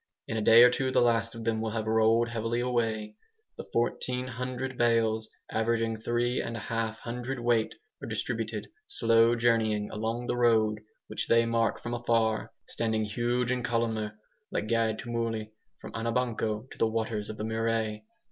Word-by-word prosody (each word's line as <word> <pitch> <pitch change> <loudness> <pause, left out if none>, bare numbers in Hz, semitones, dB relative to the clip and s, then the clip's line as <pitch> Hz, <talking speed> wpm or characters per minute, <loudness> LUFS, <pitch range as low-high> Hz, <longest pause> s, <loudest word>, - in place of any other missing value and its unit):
In 115 - -3
a 110 - 0
day 115 +2 +8
or 125 - +7
two 130 +1 0
the - - +3
last 115 -1 +2
of 115 - -7
them 110 -1 0
will 110 - -1
have 110 0 -2
rolled 110 +1 +3
heavily 115 +1 -1
away. 115 - -1 0.4
The - - -8
1400 125 +2 -2
bales, 115 -2 +2 0.2
averaging 115 0 0
three 120 +2 0
and 115 0 -4
a - - -4
half 115 0 -2
hundredweight, 120 -1 -1 0.3
are - - -6
distributed, - - -3 0.2
slow 115 - +4
journeying, 110 -3 +1
along 115 +3 -2
the 120 - -1
road, 110 -3 +3 0.3
which - - -4
they 115 0 +4
mark 115 -2 0
from 120 - -3
afar, 115 -3 +1 0.2
standing 110 -1 -1
huge 120 +3 0
and 125 -1 -1
columnar 115 -3 -1 0.3
like 105 - -2
guide 115 -1 +1
tumuli, 115 -2 -3 0.3
from - - -9
Anabanco 115 -1 -1
to - - -11
the 115 - +4
waters 110 -1 -2
of 110 - -6
the - - -4
Murray. 110 -1 -1
115 Hz, 165 wpm, -29 LUFS, 110-120 Hz, 0.4 s, day